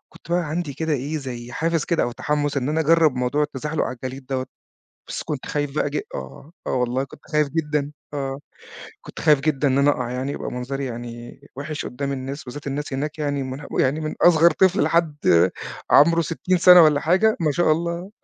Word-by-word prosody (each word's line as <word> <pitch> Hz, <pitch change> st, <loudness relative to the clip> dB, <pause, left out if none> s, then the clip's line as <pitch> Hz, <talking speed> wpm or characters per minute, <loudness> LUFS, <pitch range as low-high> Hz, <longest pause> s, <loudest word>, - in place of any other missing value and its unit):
كنت -, -, -17 dB
بقى 175 Hz, 0 st, +2 dB
عندي 155 Hz, -3 st, -3 dB
كده 160 Hz, +2 st, -2 dB
إيه، 145 Hz, +3 st, -2 dB
زي 120 Hz, -3 st, -7 dB
حافز 165 Hz, +2 st, 0 dB
كده، 170 Hz, -, +1 dB
أو 120 Hz, -, -1 dB
تحمُّس، 145 Hz, +1 st, -1 dB
إن 130 Hz, 0 st, -1 dB
أنا 155 Hz, +2 st, 0 dB
أجرِّب 160 Hz, -3 st, +4 dB
موضوع 125 Hz, +4 st, 0 dB
التزحلق 150 Hz, +2 st, -2 dB
على -, -, -4 dB
الجليد 130 Hz, +2 st, -7 dB
دوّة. 130 Hz, -1 st, -2 dB, 0.6 s
بس -, -, -4 dB
كنت 145 Hz, -4 st, -5 dB
خايف 145 Hz, -1 st, -2 dB
بقى 145 Hz, -, 0 dB
ج 150 Hz, -, -1 dB
آه، 65 Hz, -, -8 dB
آه، -, -, -2 dB
والله، 125 Hz, +1 st, 0 dB
كنت 140 Hz, -, -15 dB
خايف 150 Hz, -1 st, +2 dB
جدًا، 150 Hz, -2 st, -2 dB, 0.2 s
آه. 135 Hz, -1 st, -3 dB, 0.6 s
كنت -, -, -10 dB
خايف 150 Hz, -3 st, +5 dB
جدًا 145 Hz, 0 st, +1 dB
إن 130 Hz, -, +2 dB
أنا 140 Hz, +1 st, +4 dB
أقع، 125 Hz, -3 st, -3 dB
يعني 130 Hz, +3 st, -3 dB
يبقى -, -, -5 dB
منظري 135 Hz, +3 st, -4 dB
يعني 120 Hz, +1 st, -8 dB
وِحش 145 Hz, +3 st, -5 dB
قدّام 140 Hz, +3 st, -4 dB
الناس. 135 Hz, +2 st, -5 dB
بالذات، 140 Hz, +3 st, -8 dB
الناس 145 Hz, +1 st, -4 dB
هناك 145 Hz, +3 st, -3 dB
يعني 145 Hz, -2 st, -1 dB
من 130 Hz, +2 st, -6 dB
ه -, -, -9 dB
يعني، 135 Hz, +4 st, +2 dB
من 155 Hz, -1 st, -4 dB
أصغر 170 Hz, -1 st, +6 dB
طفل 190 Hz, +4 st, +3 dB
لحد 165 Hz, -3 st, +1 dB, 0.8 s
عمره 170 Hz, +3 st, +6 dB
60 170 Hz, +3 st, -1 dB
سنة 180 Hz, 0 st, +8 dB
والّا 150 Hz, -2 st, +4 dB
حاجة، 190 Hz, +8 st, +3 dB
ما 155 Hz, -3 st, +1 dB
شاء 165 Hz, +2 st, +2 dB
الله. 170 Hz, +3 st, -2 dB
145 Hz, 205 wpm, -22 LUFS, 135-160 Hz, 0.8 s, سنة